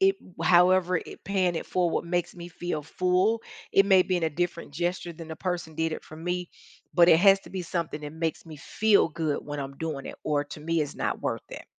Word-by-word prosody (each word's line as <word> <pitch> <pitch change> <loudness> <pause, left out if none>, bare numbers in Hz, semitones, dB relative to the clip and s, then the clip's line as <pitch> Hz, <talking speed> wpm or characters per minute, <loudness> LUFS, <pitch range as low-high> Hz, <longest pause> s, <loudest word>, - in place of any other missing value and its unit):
it 390 0 +4 0.3
however 180 +1 +5
it - - -11
paying 185 -2 +1
it - - -3
forward 175 -2 0
makes 175 0 -1
me 175 0 -8
feel 175 -3 -4
full, 185 +7 +1 0.3
it 195 0 +5
may 190 -2 +6
be 185 - 0
in - - -5
a 160 - +1
different 170 0 -3
gesture 175 +2 -2
than 165 0 -9
the 160 - -6
person 175 -4 -3
did 160 +1 -1
it - - -6
for 155 - -11
me, 175 +2 -3 0.4
but 175 -1 +6
it 160 - +7
has 195 0 +6
to - - -14
be 190 -1 -4
something 165 -3 -3
that 145 - -6
makes 160 0 -3
me 160 -2 -10
feel 210 +6 +3
good 155 -2 -1
when 145 0 -5
I'm 135 0 -6
doing 155 -4 -4
it, - - -7
or 145 -1 +1
to 145 - -10
me, 165 +1 0
it's 145 - -5
not - - -2
worth - - -3
it. - - -8
170 Hz, 235 wpm, -27 LUFS, 160-185 Hz, 0.4 s, it